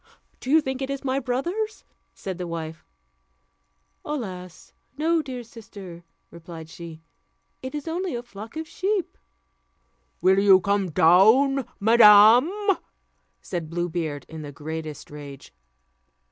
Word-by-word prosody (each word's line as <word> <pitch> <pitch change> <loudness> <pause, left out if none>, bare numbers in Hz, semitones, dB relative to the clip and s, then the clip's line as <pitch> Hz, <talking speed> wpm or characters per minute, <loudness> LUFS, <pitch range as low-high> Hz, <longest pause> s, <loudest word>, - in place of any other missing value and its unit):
"Do 255 - -8
you 315 +3 +5
think 265 -2 -4
it 265 - -3
is 275 0 -4
my 265 0 0
brothers?" 345 - -3 0.3
said 190 -2 -6
the 180 - -4
wife. 160 -1 -6 1.2
"Alas! 185 - -7 0.2
no, 325 +2 +2
dear 255 -4 -7
sister," 200 -7 -12 0.3
replied 165 -1 -10
she, 165 -1 -10 0.6
"it 260 +3 -6
is 295 +1 -6
only 345 -1 -2
a 240 - -5
flock 220 +3 -10
of 320 0 -5
sheep." 390 +1 -2 1.0
"Will 190 +1 +4
you 195 -2 +6
come 200 0 0
down, 220 - +4
madam?" 220 +4 +7 0.9
said 170 -4 -5
Blue 175 +1 -2
Beard, 155 -5 -4
in 160 -1 -9
the 145 -1 -8
greatest 155 0 -7
rage. 145 -2 -11
205 Hz, 130 wpm, -24 LUFS, 170-270 Hz, 1.2 s, madam